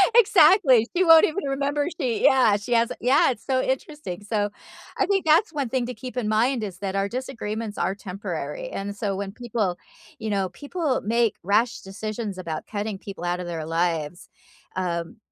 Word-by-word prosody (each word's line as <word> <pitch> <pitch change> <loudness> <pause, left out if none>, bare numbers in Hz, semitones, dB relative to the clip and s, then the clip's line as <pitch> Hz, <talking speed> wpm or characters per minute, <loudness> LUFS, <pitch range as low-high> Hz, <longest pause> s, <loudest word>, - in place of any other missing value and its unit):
Exactly, 315 - +6
she 370 - +4
won't 325 -2 +8
even 330 +3 -3
remember, 285 +2 0
she 245 -5 -1
yeah, 250 -6 +5
she 225 +4 -3
has 230 0 +3
yeah, 260 +3 +4
it's 225 - -8
so 260 -1 +1
interesting, 260 - -4
so, 205 0 -1 0.5
I - - +2
think 390 -3 +1
that's 325 +5 +4
one 275 -5 -2
thing 255 -1 0
to 250 - -4
keep 250 +3 -9
in 225 -4 -1
mind 230 +2 +2
is 190 -3 -5
that 195 -1 -3
our 195 0 0
disagreements 230 -4 -4
are 195 - 0
temporary, 205 - -5
and 200 +1 -5
so, 200 -2 -2
when 195 0 -4
people, 215 -6 -2 0.4
you 220 - -4
know, 195 -2 0
people 285 - -2
make 230 0 +1
rash 215 +5 +2
decisions 210 +1 -5
about 165 -4 -5
cutting 205 -1 -3
people 195 -2 -9
outta 175 +1 -1
their 165 -2 -4
lives, 165 -1 -2 0.5
um, 175 +3 -3
220 Hz, 180 wpm, -24 LUFS, 195-265 Hz, 0.5 s, won't